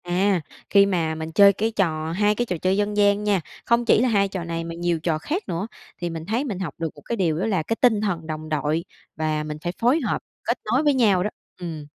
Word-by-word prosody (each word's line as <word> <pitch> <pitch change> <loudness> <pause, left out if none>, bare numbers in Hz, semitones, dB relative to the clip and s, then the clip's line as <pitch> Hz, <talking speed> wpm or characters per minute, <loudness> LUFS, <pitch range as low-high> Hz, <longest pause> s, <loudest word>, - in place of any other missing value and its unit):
À, 180 +1 +1 0.3
khi 200 -1 +6
mà 170 -5 0
mình 160 0 -5
chơi 200 +4 +7
cái 220 +4 -1
trò 160 -6 0
2 205 +4 +2
cái 240 - 0
trò 180 -6 -2
chơi 185 +1 +2
dân 205 0 0
gian 205 0 +3
nha, 205 -3 +2 0.2
không 235 0 +2
chỉ 225 - +5
là 255 - +3
2 200 -3 +3
trò 185 -2 -5
này 165 0 -3
mà 165 0 -6
nhiều 170 -1 0
trò 160 -1 0
khác 325 - -3
nữa, 170 +5 -2 0.3
thì 175 -1 -3
mình 165 -1 -6
thấy 225 +8 0
mình 205 -9 -4
học 170 -7 -4
được 165 -1 -2
một 145 - -14
cái 235 - -2
điều 165 -7 0
đó - - 0
là 190 -7 0
cái 225 - -1
tinh 220 -5 +4
thần 175 -6 -2
đồng 155 0 -5
đội 155 +2 0 0.3
và 155 0 -1
mình 150 0 -5
phải 175 - -1
phối 250 +7 +4
hợp, 235 - -1 0.2
kết 235 - 0
nối 245 +7 +2
với 295 -1 +4
nhau 205 -8 +3
đó, 210 - 0 0.3
ừm. 165 -4 -6
185 Hz, 260 wpm, -23 LUFS, 165-210 Hz, 0.3 s, chơi